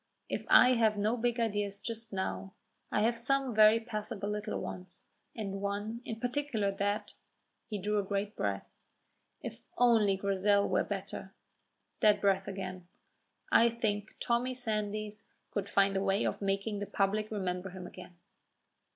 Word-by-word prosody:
If - - -3
I 250 - +8
have 220 -3 +3
no 215 +3 +2
big 240 0 0
ideas 205 -3 0
just 225 +1 -6
now, 190 0 -3 0.4
I 210 - +2
have 230 +1 +2
some 270 +1 +1
very 215 +1 +7
passable 215 -3 -4
little 210 +1 -2
ones, 180 -1 -8 0.3
and 195 -3 -4
one 205 +3 -3
in 225 -1 -5
particular 245 -5 0
that 205 +1 -2 0.3
" - - -49
He 210 - -2
drew 210 +2 0
a - - 0
great 200 +1 -2
breath. 100 -1 -2 0.8
"If - - -6 0.2
only 225 -5 +4
Grizel 200 +1 +2
were 185 - +2
better," 195 -1 -6 0.6
that 210 -1 +5
breath 195 -1 +2
said, 185 -2 -5 0.7
"I 235 - +6
think 215 -3 -2
Tommy 245 +2 0
Sandys 215 -3 -3 0.2
could 200 - -2
find 195 0 +3
a 195 - +1
way 195 +1 +2
of - - -2
making 200 +1 -1
the 205 - -4
public 205 +2 0
remember 190 -3 -2
him 185 0 -8
again." 180 0 -11
205 Hz, 155 wpm, -32 LUFS, 195-225 Hz, 0.8 s, I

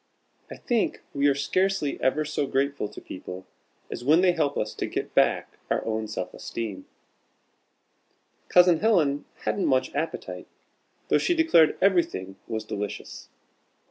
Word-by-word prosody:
I - - -8
think 235 -3 -1
we 140 0 +2
are 140 - +3
scarcely 185 +1 0
ever 150 +4 +1
so 145 -1 -1
grateful 140 -3 0
to - - -10
people 90 0 -8 0.5
as - - -5
when 155 +6 +5
they 185 -1 +5
help 155 -5 0
us 105 - -2
to - - -3
get - - -4
back - - +1
our - - 0
own 110 -1 -2
self 105 - -5
esteem. 105 -5 -6 1.6
Cousin 180 -2 +6
Helen 160 -10 +2 0.2
hadn't 200 - 0
much 130 -1 +1
appetite, 155 +4 -4 0.6
though - - +4
she 350 - +1
declared 325 - +4
everything 95 - +1
was 110 -1 -4
delicious. 105 -1 -6
145 Hz, 140 wpm, -26 LUFS, 110-175 Hz, 1.6 s, Cousin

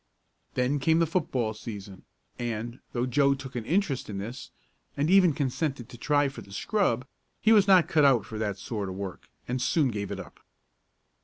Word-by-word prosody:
Then 130 +3 +1
came 160 +4 +3
the 165 - +4
football 135 -9 -1
season, 100 -3 -9 0.3
and, 120 0 -4
though 120 0 0
Joe 140 +2 +3
took 135 -1 -9
an 120 -3 -3
interest 170 - 0
in 100 - -4
this, 115 +7 -6 0.5
and 145 +4 +1
even 190 -3 +6
consented 135 -3 -2
to - - -10
try 145 +2 +2
for 135 - -7
the 100 - -14
scrub, 130 - 0 0.3
he 220 - +3
was 205 -3 +6
not 185 -3 +6
cut 155 -2 +3
out 130 -7 +5
for 110 - -6
that 105 -3 -2
sort 105 -2 -4
of 95 - -6
work, 95 -2 -7 0.2
and 125 +1 -2
soon 135 +3 +2
gave 105 -3 -3
it - - -4
up. - - -11
130 Hz, 190 wpm, -28 LUFS, 110-150 Hz, 0.5 s, even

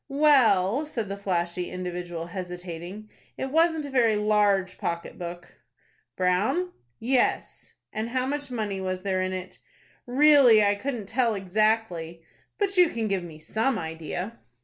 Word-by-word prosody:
"Well," 270 -6 +4
said 230 -8 -3
the 200 - -3
flashy 180 -3 -2
individual, 175 -2 -5
hesitating, 180 +2 -7 0.3
"it 265 - -4
wasn't 320 -1 +3
a 285 - -7
very 235 -4 +3
large 210 -2 +2
pocket 170 +2 -4
book." 175 0 -8 0.6
"Brown?" 195 - +1 0.3
"Yes." 250 +2 -1 0.2
"And 220 +2 -3
how 255 +1 0
much 285 +1 -3
money 210 -5 -3
was 185 -1 -3
there 190 -2 0
in 185 0 -1
it?" 185 0 -6 0.5
"Really, 260 -4 +6
I 200 - +3
couldn't 230 +1 -4
tell 230 +1 +1
exactly." 190 -4 0 0.3
"But 395 -2 0
you 355 -2 +6
can 225 -5 -2
give 195 -2 0
me 165 -3 -10
some 225 +10 -1
idea?" 165 +6 -5
205 Hz, 145 wpm, -26 LUFS, 180-250 Hz, 0.6 s, Really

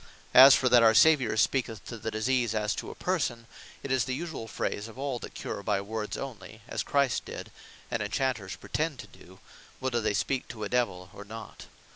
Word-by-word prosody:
As 130 +2 +10
for 130 - +1
that 125 -1 +6
our 110 -1 +6
Saviour 130 -2 +5
speaketh 115 -5 0
to 120 - -7
the 110 0 -4
disease, 115 +1 0
as 105 -1 0
to - - -6
a - - -9
person; 130 -10 -1 0.4
it 135 - -4
is 130 -2 +2
the 130 +1 -3
usuall 160 -10 -6
phrase 105 +1 -3
of 115 - -13
all 135 -2 -3
that - - -9
cure - - -5
by 100 -1 0
words 105 +1 -4
onely, 110 -4 -8
as - - -2
Christ 140 -3 +1
did, - - -8 0.4
(and 120 - -1
Inchanters 105 -2 -2
pretend 155 -2 -2
to - - -8
do, 95 +1 -17 0.4
whether 130 -3 -1
they 105 -2 0
speak 130 +5 -1
to 110 -2 -7
a 105 - -3
Divel 95 -8 -1
or 100 - -9
not.) 110 +2 -10
115 Hz, 205 wpm, -28 LUFS, 105-130 Hz, 0.4 s, As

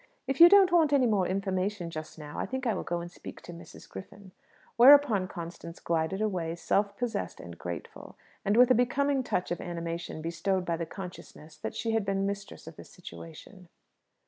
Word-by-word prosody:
If 270 +3 -1
you 340 - +11
don't 390 -2 +6
want 320 -4 +4
any 270 -3 +4
more 205 -6 +2
information 190 -1 -2
just 155 0 -8
now, 150 -1 -8
I - - -2
think 260 +1 -4
I 230 - +2
will 185 - -3
go 175 0 -3
and 175 0 -8
speak - - -10
to 175 - -10
Mrs. 170 - -13
Griffin." 190 0 -11 0.4
Whereupon 245 -6 +7
Constance 170 -1 -8
glided 165 +4 -1
away, 175 -6 -2
self 200 +3 0
possessed 235 -4 -3
and 85 -1 -9
graceful, 85 +1 -8 0.3
and 205 +3 +1
with 250 +1 +6
a - - +8
becoming 270 +3 +1
touch 180 -9 -2
of 175 - -2
animation 170 -1 -5
bestowed 180 +3 -1
by 170 -1 -1
the 165 -1 -4
consciousness 170 -4 -10
that - - -6
she 225 0 -2
had 225 -1 +1
been 195 0 -1
mistress 200 0 -5
of 160 -1 -11
the - - -10
situation. 175 +1 -12
190 Hz, 195 wpm, -29 LUFS, 170-230 Hz, 0.4 s, you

